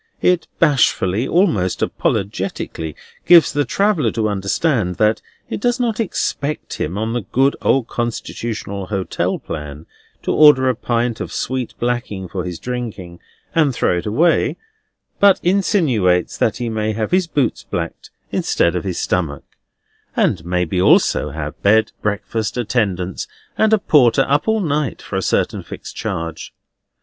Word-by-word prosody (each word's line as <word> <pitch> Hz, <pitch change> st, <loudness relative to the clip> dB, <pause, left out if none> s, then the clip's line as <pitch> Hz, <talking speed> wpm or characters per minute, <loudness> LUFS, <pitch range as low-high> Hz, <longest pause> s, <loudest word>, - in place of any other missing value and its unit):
It 180 Hz, -2 st, +2 dB
bashfully, 125 Hz, -, +2 dB
almost 160 Hz, -, +1 dB
apologetically, 95 Hz, -5 st, -2 dB, 0.3 s
gives 170 Hz, -5 st, +7 dB
the 145 Hz, 0 st, +1 dB
traveller 195 Hz, -, +1 dB
to 110 Hz, -2 st, 0 dB
understand 100 Hz, -, 0 dB
that 110 Hz, +3 st, +2 dB, 0.3 s
it -, -, -4 dB
does 245 Hz, +1 st, +1 dB
not 235 Hz, -3 st, 0 dB
expect 150 Hz, -8 st, -2 dB
him, 85 Hz, +6 st, -2 dB
on 110 Hz, +2 st, -2 dB
the 120 Hz, -, -1 dB
good 135 Hz, +7 st, +1 dB
old 130 Hz, -3 st, +2 dB
constitutional 110 Hz, -4 st, -4 dB
hotel 95 Hz, -2 st, -1 dB
plan, 75 Hz, -1 st, -7 dB, 0.4 s
to -, -, -1 dB
order 150 Hz, -4 st, +6 dB
a 130 Hz, -, +3 dB
pint 120 Hz, 0 st, -1 dB
of -, -, -5 dB
sweet 130 Hz, -1 st, -3 dB
blacking 120 Hz, -6 st, -2 dB
for 90 Hz, 0 st, -4 dB
his 90 Hz, -2 st, -5 dB
drinking, 110 Hz, -9 st, -6 dB, 0.3 s
and 150 Hz, -6 st, +2 dB
throw 90 Hz, -, +1 dB
it 85 Hz, -, -6 dB
away; 160 Hz, +11 st, +2 dB, 0.6 s
but 200 Hz, -2 st, +6 dB
insinuates 150 Hz, -, +2 dB
that 110 Hz, -, 0 dB
he 120 Hz, -, -3 dB
may 110 Hz, -1 st, -1 dB
have 110 Hz, 0 st, -2 dB
his 185 Hz, -1 st, +2 dB
boots 145 Hz, -6 st, 0 dB
blacked -, -, -5 dB, 0.2 s
instead 85 Hz, -, +1 dB
of 90 Hz, -, -2 dB
his 95 Hz, -3 st, -3 dB
stomach, 80 Hz, -6 st, -1 dB, 0.7 s
and -, -, +1 dB
maybe 90 Hz, +1 st, 0 dB
also 75 Hz, -4 st, +4 dB
have 75 Hz, 0 st, -6 dB
bed, 110 Hz, +2 st, +4 dB
breakfast, 105 Hz, +2 st, -2 dB
attendance, 100 Hz, -7 st, -1 dB, 0.3 s
and 220 Hz, 0 st, +2 dB
a 220 Hz, -, +6 dB
porter 135 Hz, -, +4 dB
up 145 Hz, +6 st, +1 dB
all 220 Hz, -1 st, +2 dB
night, 150 Hz, -, -1 dB
for -, -, -7 dB
a 95 Hz, -, 0 dB
certain -, -, 0 dB
fixed -, -, -9 dB
charge. 80 Hz, 0 st, -5 dB
115 Hz, 150 wpm, -19 LUFS, 95-145 Hz, 0.7 s, gives